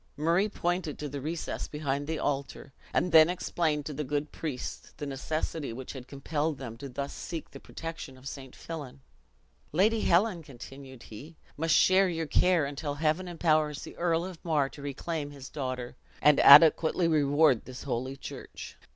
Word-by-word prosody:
Murray 170 +7 +2
pointed 175 -5 -2
to 150 - -4
the 140 0 -6
recess 160 +3 -4
behind 145 -1 -3
the 160 0 -2
altar; 140 -1 -3 0.2
and 180 - +1
then 160 0 +8
explained 160 -4 -1
to 150 - -4
the 150 +2 -3
good 145 +1 -2
priest 145 -6 -6
the 145 - -5
necessity 145 +1 -3
which 125 +3 -7
had 130 -2 -9
compelled 145 +2 -2
them 125 -4 -7
to 140 +2 -8
thus 140 +2 -5
seek 165 -2 -6
the - - -10
protection 165 -5 -8
of 130 +1 -11
St. 135 -2 -8
Fillan. 140 -5 -8 0.7
"Lady 215 +7 +3
Helen," 180 0 +2
continued 135 -2 -11
he, 150 +9 -11 0.2
"must 160 +1 +2
share 190 0 +5
your 165 -2 -2
care 175 0 +3
until 145 +1 -4
Heaven 155 +4 0
empowers 155 -4 +1
the - - -9
Earl 170 0 0
of 185 -3 -9
Mar 150 -5 +1
to 145 - -12
reclaim 145 +2 -4
his 140 -2 -10
daughter, 130 -4 -4 0.2
and 150 -1 +5
adequately 160 +3 +8
reward 145 -4 +3
this 130 +1 -9
holy 130 +1 -3
church." - - -9
150 Hz, 170 wpm, -29 LUFS, 135-165 Hz, 0.7 s, then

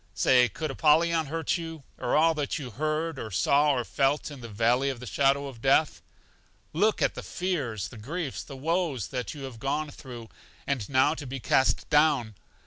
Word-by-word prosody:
Say, 125 -2 +4
could 155 +8 -4
Apollyon 160 +2 +3
hurt 165 +3 -1
you, 165 -3 -7 0.2
or - - 0
all 165 +2 +5
that 150 0 -2
you 135 -6 -6
heard, 155 +4 -2
or 110 - -5
saw, 140 +10 +3
or 125 -2 0
felt 140 +4 0
in 140 -3 -10
the 115 - -8
Valley 120 +6 +2
of 130 -3 -4
the 125 - -8
Shadow 140 +2 +2
of 130 -5 -9
Death? 140 +4 +2 0.7
Look 210 +7 +2
at - - +2
the - - -7
fears, 130 - -3
the 110 - -11
griefs, 150 +5 -4
the 135 - -10
woes 160 - -1
that 125 +2 -4
you 140 - -8
have 130 -4 -8
gone 145 +4 -2
through. 120 -5 -10 0.4
And 135 -7 -2
now 130 +2 +4
to 150 -4 -7
be 135 +2 -5
cast 130 +2 +2
down! 145 -7 +3
140 Hz, 195 wpm, -27 LUFS, 125-155 Hz, 0.7 s, all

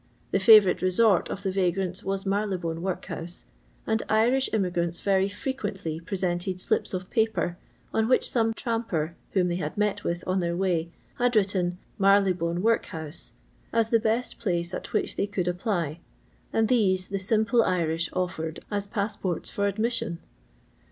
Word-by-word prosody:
The 195 - +2
favourite 205 -2 +7
resort 185 +1 +3
of 200 - -5
the 190 - 0
vagnnts 185 -1 0
was 195 0 -2
Marylebone 190 -5 -1
workhouse, 175 -2 -5 0.4
and 220 0 +1
Irish 240 +5 +3
immigrants 175 -4 0
very 195 0 +2
frequently 205 - -4
presented 180 0 -2
slips 185 - -1
of 185 0 -6
paper 220 -6 +1 0.4
on 220 0 +2
which 255 - +3
some 225 -2 +2
tramper 220 - -2 0.2
whom 185 -2 +3
they 175 0 -1
had 155 -1 -4
met 210 0 0
with 175 +1 -2
on 185 +1 +1
their 170 -1 -1
way 175 -3 0 0.3
had 245 -1 +2
written 190 -4 +1
'' - - -35
Marylebone 185 -3 +3
worihotue," 165 -8 -2 0.4
as 225 -1 +2
the 230 - +4
best 225 +2 -1
place 175 -4 -1
at - - -5
which - - -1
they 200 - +1
could 185 -3 -2
apply, 175 -4 -1 0.5
and 225 0 +2
these 190 -6 +2
the 195 0 -2
simple 220 +4 +2
Irish 170 -4 0
offered 165 -3 -3
as 205 -1 -1
pass 205 +1 -2
ports 180 -3 -3
for 200 0 0
admission 215 -3 -1
190 Hz, 160 wpm, -27 LUFS, 175-215 Hz, 0.5 s, favourite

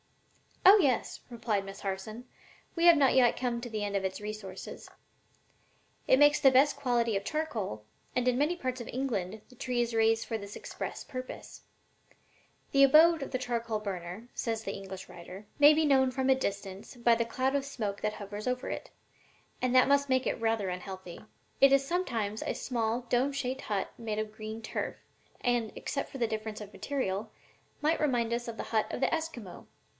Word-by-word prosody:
"Oh 390 +3 +10
yes," 265 -7 +1
replied 225 -4 -1
Miss 195 0 -9
Harson; 205 +5 -5 0.5
"we 335 0 +2
have 340 -2 +8
not 275 -2 +4
yet 250 -2 +4
come 240 -2 -1
to 245 - -6
the 215 -2 -3
end 200 -1 -2
of 195 - 0
its 190 0 -2
resources. 210 -3 -7 1.2
It 260 - +6
makes 290 +1 +6
the 270 - +7
best 270 +3 +4
quality 240 -5 +1
of 195 - -1
charcoal, 215 - -3 0.3
and 250 0 +1
in 250 -1 +3
many 300 +6 +2
parts 255 -6 -3
of 235 - -7
England 220 -6 -3
the 250 - -17
tree 250 0 -2
is 235 0 -1
raised 225 0 +3
for 225 -2 -3
this 200 0 -9
express - - -6
purpose. 255 0 -8 1.1
'The 275 0 +6
abode 315 +4 +7
of 275 - -4
the 255 - 0
charcoal 235 -3 -2
burner,' 190 +1 -6
says 225 -1 -3
an 195 - -1
English 190 -1 -8
writer, 185 +4 -10
'may 290 +1 +9
be 315 0 +3
known 265 -2 +4
from 265 +1 +1
a - - +6
distance 200 -4 -4
by 235 -1 +4
the 230 0 +1
cloud 260 +3 0
of 280 - +1
smoke 220 -8 -4
that 215 0 0
hovers 205 +2 -7
over 250 +1 -1
it, - - -5 0.7
and 255 0 +1
that 255 - +7
must 280 0 +3
make 260 0 +2
it - - -1
rather 225 -4 +1
unhealthy. 180 -1 -7 0.4
It 275 0 +7
is 275 0 +4
sometimes 230 - -1
a - - -2
small 235 -1 -1
dome 250 +3 +1
shaped 260 -1 -3
hut 205 -2 -2
made 220 -2 -3
of 215 0 -2
green 220 +1 -7
turf, - - -3 0.5
and, 240 -3 +1
except 275 - -3
for - - -8
the 235 -3 +1
difference 220 -1 -4
of 205 -1 -9
the - - -13
material, 220 -7 -2 0.5
might 315 +2 +2
remind 240 -6 +1
us 240 0 -2
of 230 -1 -6
the - - -3
hut 220 -1 +1
of - - -3
the 270 - +1
Esquimaux. 315 - -5
235 Hz, 195 wpm, -30 LUFS, 210-265 Hz, 1.2 s, Oh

